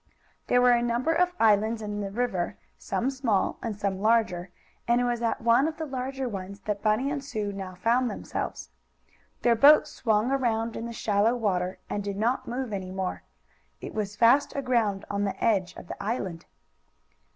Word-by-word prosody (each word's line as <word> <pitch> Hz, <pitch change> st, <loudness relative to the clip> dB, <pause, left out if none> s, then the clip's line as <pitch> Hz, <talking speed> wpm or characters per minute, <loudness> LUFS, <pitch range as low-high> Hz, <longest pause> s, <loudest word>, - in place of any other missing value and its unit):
There 245 Hz, 0 st, +4 dB
were 250 Hz, -, +6 dB
a 240 Hz, -1 st, +4 dB
number 240 Hz, +6 st, +1 dB
of 360 Hz, +2 st, +2 dB
islands 220 Hz, +1 st, +3 dB
in 210 Hz, -1 st, -4 dB
the 200 Hz, -, -3 dB
river, 195 Hz, -5 st, -2 dB, 0.2 s
some 260 Hz, +3 st, -2 dB
small 245 Hz, -7 st, 0 dB
and 225 Hz, -4 st, -4 dB
some 195 Hz, -2 st, -1 dB
larger, 215 Hz, -5 st, +2 dB, 0.4 s
and 235 Hz, +1 st, +3 dB
it -, -, +1 dB
was 240 Hz, -1 st, -1 dB
at 230 Hz, -, -1 dB
one 235 Hz, +5 st, +4 dB
of 320 Hz, -1 st, -4 dB
the 320 Hz, -, -3 dB
larger 265 Hz, -1 st, -3 dB
ones 200 Hz, -2 st, -6 dB
that 205 Hz, 0 st, -3 dB
Bunny 220 Hz, +6 st, +1 dB
and 285 Hz, -2 st, -3 dB
Sue 215 Hz, -6 st, -3 dB
now 190 Hz, -2 st, -6 dB
found 235 Hz, +6 st, +2 dB
themselves. 210 Hz, -, -5 dB, 0.7 s
Their 240 Hz, -, +5 dB
boat 290 Hz, +7 st, +7 dB
swung 225 Hz, -4 st, 0 dB
around 230 Hz, -4 st, 0 dB
in 230 Hz, -, -4 dB
the -, -, -6 dB
shallow 220 Hz, +1 st, +1 dB
water, 185 Hz, -5 st, -1 dB
and 205 Hz, -, -3 dB
did 200 Hz, -1 st, -4 dB
not 235 Hz, +5 st, 0 dB
move 245 Hz, -2 st, -3 dB
any 190 Hz, -2 st, -4 dB
more. 190 Hz, 0 st, -3 dB, 0.6 s
It -, -, -8 dB
was 205 Hz, -2 st, -3 dB
fast 235 Hz, +6 st, +4 dB
aground 235 Hz, -7 st, 0 dB
on 200 Hz, 0 st, -2 dB
the 200 Hz, -, -2 dB
edge 190 Hz, -5 st, +1 dB
of -, -, -11 dB
the -, -, -7 dB
island. 200 Hz, -6 st, -3 dB
225 Hz, 185 wpm, -27 LUFS, 200-245 Hz, 0.7 s, boat